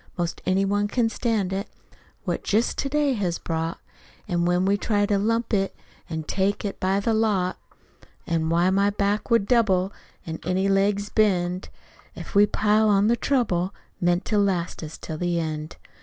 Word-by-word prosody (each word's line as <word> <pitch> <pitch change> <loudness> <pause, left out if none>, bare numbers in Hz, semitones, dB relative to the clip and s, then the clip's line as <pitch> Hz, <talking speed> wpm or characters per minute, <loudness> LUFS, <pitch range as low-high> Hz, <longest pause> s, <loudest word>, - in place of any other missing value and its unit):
'Most 175 -1 -2
any 190 +1 +2
one 205 +1 +1
can 230 +2 +1
stand 220 -5 -1
it 195 +2 -3 0.5
What - - -2
jest 220 +4 +1
TO 275 - -1
DAY 295 -1 +2
has 185 -7 -1
brought. 165 0 -3 0.5
It's 180 - -2
when 175 +1 +2
we 200 +1 +3
try 205 0 +1
to 205 -1 +1
lump 230 +3 0
it, 195 -1 +1 0.3
An' 160 -1 -3
take 195 +5 -1
it 200 - -4
by 190 +1 +1
the 225 +3 0
lot! 205 -5 +1 0.7
Why, 165 +1 +1
any 200 +1 +4
back 205 +2 -1
would 230 -4 +3
double, 200 -5 +2 0.3
An' 160 -1 -5
any 185 +3 0
legs'll 200 +1 +1
bend, 185 -4 +1 0.5
If - - -9
we 205 0 +6
pile 215 +1 +2
on 200 -1 +4
all 210 - +3
the 235 - +4
trouble 205 -9 0 0.2
Meant 175 0 +1
to 210 - +1
last 185 -4 0
us 155 0 -7
till 155 -1 -7
the 175 -1 0
end! 155 0 -4
195 Hz, 180 wpm, -24 LUFS, 175-210 Hz, 0.7 s, we